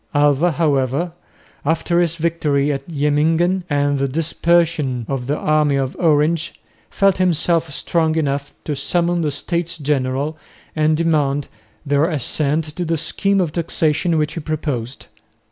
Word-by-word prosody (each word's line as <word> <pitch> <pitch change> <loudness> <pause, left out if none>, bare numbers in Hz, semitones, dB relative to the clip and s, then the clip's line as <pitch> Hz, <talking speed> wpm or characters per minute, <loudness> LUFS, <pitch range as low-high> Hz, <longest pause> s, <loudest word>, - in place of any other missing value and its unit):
Alva, 145 +3 +3
however, 145 +1 0 0.5
after 165 +3 +1
his 170 -1 0
victory 155 -4 0
at 135 +2 -5
Jemmingen 160 +5 +1
and 145 -1 +1
the 140 - +1
dispersion 160 -3 +1
of 135 -3 -3
the 145 +2 0
army 150 -2 +2
of 135 -1 -1
Orange, 160 0 +1 0.3
felt 195 -2 +2
himself 165 -2 +1
strong 160 +2 0
enough 140 -2 -1
to 150 - -3
summon 170 +4 0
the 155 - 0
States 170 +4 -3
General 140 0 -1 0.4
and 155 0 +2
demand 145 -4 +1 0.4
their 145 +1 +2
assent 150 +1 0
to 180 - -1
the 165 -1 0
scheme 195 +5 0
of 175 -5 0
taxation 165 0 0
which 150 -1 0
he - - -4
proposed. 145 -5 -4
155 Hz, 140 wpm, -19 LUFS, 140-170 Hz, 0.5 s, Alva